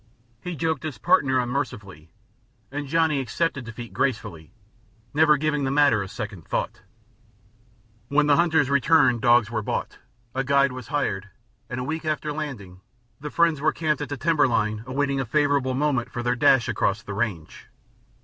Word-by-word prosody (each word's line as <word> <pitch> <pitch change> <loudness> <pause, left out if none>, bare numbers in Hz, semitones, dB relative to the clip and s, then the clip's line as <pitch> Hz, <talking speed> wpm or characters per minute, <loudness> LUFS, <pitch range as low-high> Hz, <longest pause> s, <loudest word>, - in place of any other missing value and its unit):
He 180 -1 -5
joked 160 -1 -1
his 155 -7 -5
partner 140 - +3
unmercifully, 110 - -4 0.6
and 145 0 -4
Johnny 160 -1 +2
accepted 135 +1 -2
defeat 115 0 -9
gracefully, 105 - -2 0.6
never 150 0 +5
giving 150 -1 0
the 135 - 0
matter 140 -6 +3
a 100 - -4
second 100 -4 -7
thought. - - -3 1.3
When 145 +3 +2
the 145 -1 +4
hunters 160 -4 +2
returned, 140 -4 +4
dogs 120 -1 +4
were 110 -2 -1
bought, 105 - -4 0.3
a 135 - -1
guide 140 0 +3
was 125 -3 -8
hired, 105 -9 -2 0.4
and, 125 - -4
a - - -3
week 160 +5 -4
after 155 -1 -2
landing, 110 -12 -7 0.4
the 150 +1 -6
friends 165 -2 +2
were 155 - +3
camped 155 -2 -1
at 145 -2 -5
timber 155 -2 +3
line 110 -2 -1
awaiting 140 +1 -1
a - - 0
favorable 140 0 +1
moment 135 -3 0
for 120 - -4
their 120 0 +1
dash 125 0 +4
across 105 -2 0
the 100 - -6
range. 100 -7 -4
135 Hz, 165 wpm, -24 LUFS, 115-150 Hz, 1.3 s, never